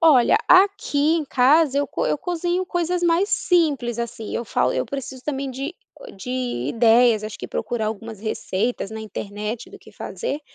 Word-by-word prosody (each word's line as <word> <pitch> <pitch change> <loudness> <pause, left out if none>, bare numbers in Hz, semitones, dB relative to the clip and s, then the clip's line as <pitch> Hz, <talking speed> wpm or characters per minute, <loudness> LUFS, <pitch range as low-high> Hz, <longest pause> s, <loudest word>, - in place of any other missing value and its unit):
Olha, 295 -8 +6
aqui 360 -5 +4
em 320 - -1
casa 275 +3 +4
eu 285 - +1
co - - -2
eu - - +1
cozinho 350 +2 -1
coisas 350 -1 -1
mais 345 +4 +3
simples 285 - +1
assim, 235 -1 -5
eu 235 - -2
falo - - +1
eu - - 0
preciso 265 -2 -6
também 275 -2 -3
de 275 +6 -5 0.4
de 195 +6 -7 0.4
ideias, 230 -1 +4
acho 215 0 -6
que - - -6
procurar 230 -3 -2
algumas 220 0 -5
receitas 215 0 -2
na 220 0 -6
internet 210 +2 -5
do - - -12
que - - -17
fazer, 380 -11 -4
260 Hz, 170 wpm, -22 LUFS, 225-330 Hz, 0.4 s, Olha